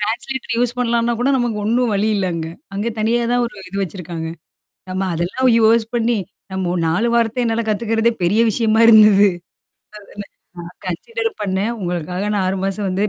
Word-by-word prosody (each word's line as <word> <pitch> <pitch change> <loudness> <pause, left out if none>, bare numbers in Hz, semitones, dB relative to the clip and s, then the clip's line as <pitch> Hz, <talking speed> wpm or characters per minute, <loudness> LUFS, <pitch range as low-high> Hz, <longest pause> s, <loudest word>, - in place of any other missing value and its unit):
Translator 235 +5 -3
use 245 0 0
பண்ணலாம்ன்னா 235 -1 +1
கூட, 260 - +1
நமக்கு 240 -4 -1
ஒண்ணும் 235 +2 +1
வழி 205 +2 +1
இல்ல 195 -2 0
அங்க. 160 -1 -4 0.3
அங்க 205 +4 -2
தனியா 230 +3 +1
தான் 245 0 +2
ஒரு 235 - -10
இது 195 - -7
வச்சிருக்காங்க. 170 -3 -5 0.6
நம்ம 185 +1 -2
அதெல்லாம் 180 +10 0
யூஸ் 225 +1 +4
பண்ணீ, 235 -1 +1 0.3
நம்ப 190 -1 -2
ஒரு 180 - -1
4 205 +9 +1
வாரத்த 235 +1 +1
என்னால 230 0 0
கத்துக்கிறதே 225 +2 +1
பெரிய 205 +6 +2
விஷயமா 220 0 +1
இருந்தது. 210 -2 +7 0.7
அதனா 205 0 -10 0.3
நான் 175 +1 -9
கன்சிடர் 455 - -3
பண்ணேன். 195 +3 -1
உங்களுக்காக 180 +1 -3
நான் 195 -2 0
6 190 +1 -1
மாசம் 195 +1 -2
வந்ததே 195 +3 0
215 Hz, 170 wpm, -19 LUFS, 190-235 Hz, 0.7 s, இருந்தது